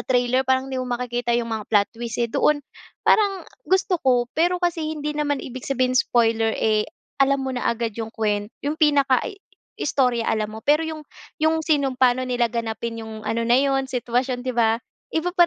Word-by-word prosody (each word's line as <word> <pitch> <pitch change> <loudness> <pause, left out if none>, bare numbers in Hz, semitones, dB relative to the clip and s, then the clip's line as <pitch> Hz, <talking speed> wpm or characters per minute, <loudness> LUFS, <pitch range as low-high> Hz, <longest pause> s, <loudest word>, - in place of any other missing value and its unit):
trailer 250 0 +2
parang 260 0 +2
hindi 260 - -1
mo 255 - -4
makikita 240 -1 -1
yung 230 -1 -2
mga 220 -2 -4
plot 205 -2 +3
twist, 235 -1 -5
eh, 240 - +1
doon 265 +6 +2 0.5
parang 400 -3 +3 0.2
gusto 375 -2 +2
ko. 250 -2 +3
Pero 350 +3 +2
kasi 350 -2 -1 0.2
hindi 300 0 -3
naman 295 -1 0
ibig 255 +1 -7
sabihin 255 -2 +1
spoiler, 225 -3 +2
eh, 215 -1 +1 0.3
alam 275 0 +3
mo 265 - -2
na 245 - -1
agad 235 -1 -1
yung 220 - -4
kuwen 210 -2 -1 0.2
yung 290 +1 0
pinaka 280 -4 +4
i 400 - -6 0.4
istorya 250 -5 +1
alam 215 -1 0
mo 220 - -8
pero 300 +2 +4
yung 315 -2 -6 0.3
yung 315 +1 +2
sinong 280 -4 +1
paano 255 0 +2
nila 240 -2 +1
ganapin 230 0 -3
yung 220 -1 -8
ano 230 +1 -1
na 240 - +4
yun 270 0 +2
sitwasyon 250 0 -1
'di 255 - -2
ba, 225 0 +3 0.3
iba 325 +2 0
pa 345 -1 +7
255 Hz, 195 wpm, -23 LUFS, 230-285 Hz, 0.5 s, pa